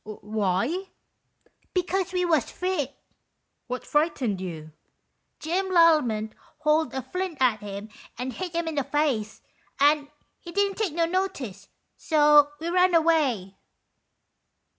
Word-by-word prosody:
"Why?" 215 - -2 0.5
" - - -39
Because 365 0 0
we 360 -1 0
was 315 -8 +2
frit." 360 -7 -2 0.7
"What 250 +1 -5
frightened 275 - 0
you? 160 -4 -7 0.2
" - - -50
" - - -50
Jim 360 +5 -1
Lallement 300 -12 +4 0.3
hauled 305 -1 +2
a 265 - -3
flint 365 -3 -4
at 245 -4 +3
him 205 +1 -7 0.3
and 250 +2 -4
hit 360 +6 -5
him 335 0 -1
in 320 - -2
the 285 -2 0
face, 260 -8 -1 0.4
and 290 +1 +4 0.3
he 345 - -10
didn't 400 +2 0
take 405 -8 0
no 335 -1 +2
notice, 280 - -3 0.3
so 295 -2 +5
we 330 +2 -3
run 360 0 +3
away." 285 - +1
300 Hz, 140 wpm, -26 LUFS, 225-345 Hz, 0.7 s, so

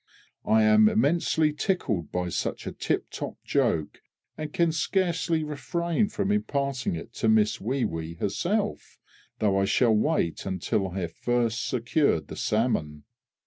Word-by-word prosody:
I 110 0 +5
am 110 0 +6
immensely 155 +4 +2
tickled 140 - -1
by 90 0 -2
such - - -3
a - - -3
tip - - -2
top - - -5
joke, 75 -2 0 0.3
and 155 -1 -5
can 170 0 +2
scarcely 165 0 0
refrain 170 - -1
from 205 -1 -1
imparting 140 - -1
it 85 +7 -8
to 110 - +1
Miss 110 0 +3
WEE 125 +5 0
WEE 80 0 -4
herself, 195 - -2 0.4
though 100 -2 +2
I 95 - +2
shall 115 +3 +3
wait 110 - 0
until 95 +1 -1
I 95 +1 -4
have 85 -2 -4
first 120 -2 0
secured 120 - +1
the - - -6
salmon. 80 - -1
120 Hz, 145 wpm, -27 LUFS, 95-160 Hz, 0.4 s, am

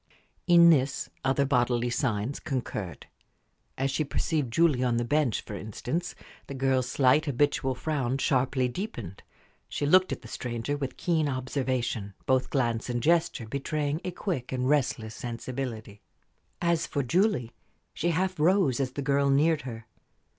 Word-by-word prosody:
In 170 -1 +8
this, 140 -2 +1
other 135 +1 +2
bodily 120 -2 +1
signs 120 0 -1
concurred. 120 - -4 0.7
As 135 +1 0
she 155 - 0
perceived 145 -2 -1
Julie 150 -2 +3
on 120 -2 +1
the 120 - 0
bench, 145 -3 +1
for - - -9
instance, 120 - -4 0.3
the 140 - -6
girl's 130 -1 +1
slight, 135 +3 +3
habitual 140 -1 +1
frown 135 -3 -1
sharply 130 -1 +1
deepened; 120 - -6 0.5
she - - -2
looked 185 +5 +5
at - - -4
the - - -9
stranger 120 +3 -3
with 135 -3 -4
keen 160 -4 +1
observation, 130 -6 -2
both 130 -1 +2
glance 120 -4 0
and 120 -1 -2
gesture 165 -7 +2
betraying 145 +4 -2
a - - -2
quick 170 - -4
and 130 -1 -1
restless 130 -6 +1
sensibility. 120 -3 -6 0.6
As 170 -2 +1
for 140 - -1
Julie, 170 - +1 0.4
she 175 - -1
half 185 +1 0
rose 160 -6 +3
as 130 -2 -1
the 140 - -4
girl 140 0 +2
neared 150 +3 +3
her. 115 -3 -8
135 Hz, 150 wpm, -28 LUFS, 120-150 Hz, 0.7 s, In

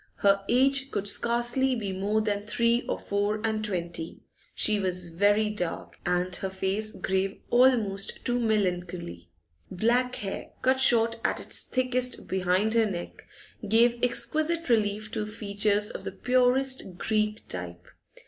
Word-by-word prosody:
Her 200 0 +2
age 270 +2 +3
could 205 -5 -3
scarcely 240 +4 +1
be 205 -5 -4
more 205 +3 0
than 205 -1 -3
three 235 +3 +1
or - - -1
four 205 +1 -2
and 220 -1 -1
twenty; 170 -5 -3 0.3
she 210 -1 +3
was 180 -2 -1
very 205 +5 +2
dark, 180 -5 -4
and 180 0 0
her 190 - -4
face 190 +3 0
grave 190 +1 -2
almost 230 -6 +2
to 245 -1 0
melancholy. 180 - -2 0.4
Black 240 +6 0
hair, 195 -1 -5
cut 260 0 +2
short 230 -3 +4
at - - 0
its - - +1
thickest 255 -1 0
behind 190 +3 0
her 225 -1 +3
neck, 175 -3 -7 0.4
gave 235 +3 +3
exquisite 305 +7 0
relief 215 -2 0
to 210 -1 -3
features 210 -1 0
of - - -8
the - - -5
purest 255 -5 +1
Greek 215 +1 -2
type. 90 -1 -5
215 Hz, 140 wpm, -27 LUFS, 190-240 Hz, 0.4 s, short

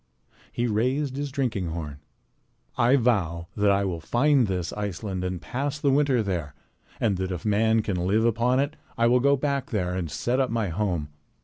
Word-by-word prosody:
He 120 - -1
raised 130 +5 0
his 145 +1 -3
drinking 120 - -1
horn. 80 -3 -5 0.8
"I 120 +3 +4
vow 95 - +1
that 105 -1 +2
I 100 0 +3
will 90 -3 -2
find 125 - +2
this 90 -3 -2
Iceland 100 -2 -4
and 90 -1 -3
pass 135 - -3
the 145 -2 +1
winter 135 -4 +3
there, 85 -8 -3 0.4
and 100 -5 +1
that 95 0 -2
if 90 +1 -5
man 110 +1 +3
can 90 -4 -1
live 110 +4 +2
upon 120 +3 +2
it 140 +1 -1 0.2
I 115 - +3
will 125 +2 +4
go 140 +2 +3
back 140 0 -1
there 90 -5 -1
and 90 -3 -3
set 120 - -1
up 130 - +2
my 115 -4 -1
home." 85 -4 -2
110 Hz, 190 wpm, -26 LUFS, 90-125 Hz, 0.8 s, I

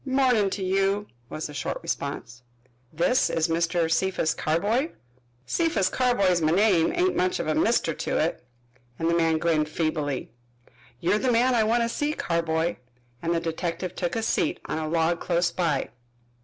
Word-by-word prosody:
"Mornin' 260 -6 +2
to 195 0 -4
you," 195 +2 +1 0.2
was 155 - -5
the 150 - -7
short 145 - -3
response. 125 -4 -4 0.5
"This 170 +11 +2
is 165 +1 0
Mr. 165 0 +1
Cephas 165 -1 +1
Carboy?" 210 - 0 0.6
"Cephas 255 - +1
Carboy's 200 -9 +2
my 155 0 +2
name 185 -2 +3
ain't 365 +1 +2
much 180 0 +1
of - - -3
a 155 - +1
mister 220 -6 +2
to - - -2
it," 160 -3 -1 0.5
and 165 - -1
the 170 - +2
man 165 -1 +2
grinned 155 -2 +1
feebly. 155 -4 -2 0.7
"You're 205 +8 +1
the 255 +1 +1
man 245 +2 +3
I 230 -2 +3
want 235 +2 +2
to - - +1
see, 295 +5 -1
Carboy," 165 0 -1 0.4
and 170 0 0
the - - +2
detective 170 +2 -3
took 175 -2 -2
a 225 - -1
seat - - 0
on 155 - -3
a 155 -1 -3
log 165 +1 +1
close 170 -1 0
by. 160 -7 -1
170 Hz, 170 wpm, -26 LUFS, 160-210 Hz, 0.7 s, name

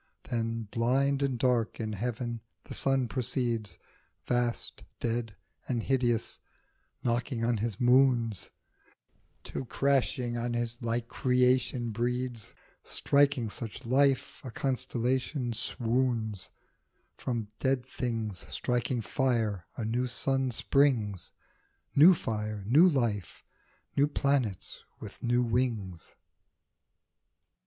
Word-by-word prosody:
Then 115 -1 -2
blind 135 +4 +2
and 135 -3 0
dark 120 -3 +1
in 110 -1 -2
heaven 120 +2 -3 0.2
the - - -8
sun 135 -2 +2
proceeds, 120 -5 -2 0.5
Vast, 120 -1 -1 0.2
dead 115 -2 -2 0.3
and 120 -3 -1
hideous, 120 -4 0 0.6
knocking 120 0 0
on 120 -1 +2
his 110 -1 -2
moons, 120 -4 +3 0.9
Till - - -5
crashing 130 -2 +1
on 120 0 -2
his 120 +1 -3
like 115 0 -1
creation 125 -2 +2
breeds, 120 0 -2 0.3
Striking 140 -5 +2
such 115 +2 -5
life, 135 +2 +2
a 130 - -6
constellation 130 0 -1
swoons; 115 -3 -1 0.7
From 115 -4 -3
dead 130 -2 +1
things 115 -7 -3
striking 120 0 0
fire 110 -6 0
a 115 - -2
new 120 +3 0
sun 135 +1 0
springs, 120 -6 +2 0.6
New 170 +6 +9
fire, 105 -6 -3
new 150 - +6
life, 115 - -1 0.5
new 140 +1 +4
planets 140 -9 0 0.2
with - - -10
new 120 +1 +2
wings. 115 -7 -2
120 Hz, 105 wpm, -30 LUFS, 115-130 Hz, 0.9 s, New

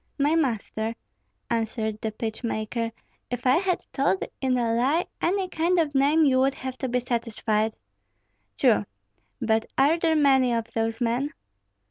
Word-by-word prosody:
"My 290 +2 +2
master," 230 -6 -1 0.6
answered 220 -1 -1
the 220 - -2
pitch 220 +2 -5
maker, 230 0 -2 0.4
"if 245 0 -4
I 255 +3 +5
had 365 0 0
told 230 -9 +1 0.2
in 260 -2 +1
a 230 -2 +1
lie 270 +9 +2 0.2
any 380 +2 +1
kind 350 +1 +1
of 305 -3 +1
name, 290 +4 +4
you 260 -2 +4
would 270 +1 +2
have 260 -1 -5
to 260 - -2
be 250 +1 +1
satisfied." 225 -3 -1 0.8
"True! 105 -1 +3 0.5
But 225 -2 +1
are 295 +5 +4
there 325 -1 +2
many 265 -4 +4
of 230 -1 -3
those 225 +1 -1
men?" 245 +5 0
250 Hz, 155 wpm, -26 LUFS, 225-285 Hz, 0.8 s, I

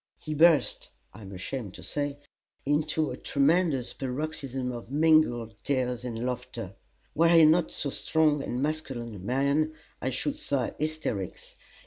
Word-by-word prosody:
He 155 - -5
burst 160 0 +4 0.2
I 110 - -12
am 100 -1 -9
ashamed 100 +2 -5
to - - -11
say 145 -1 -3 0.5
into 150 +2 +1
a - - -5
tremendous 145 -2 +1
paroxysm 135 -1 -3
of 120 -1 -8
mingled 145 -7 +3
tears 125 -3 -1
and 120 -1 -4
laughter: 120 -5 -4 0.4
were 165 +2 +4
he 165 -2 +8
not 160 +2 +4
so 140 - -2
strong 155 -1 +2
and 125 0 -2
masculine 135 -7 -3
a 100 - -8
man, 140 +9 +1 0.3
I 130 - 0
should 275 - -2
say, 140 - -1
"hysterics." 155 - -3
140 Hz, 145 wpm, -28 LUFS, 125-155 Hz, 0.5 s, he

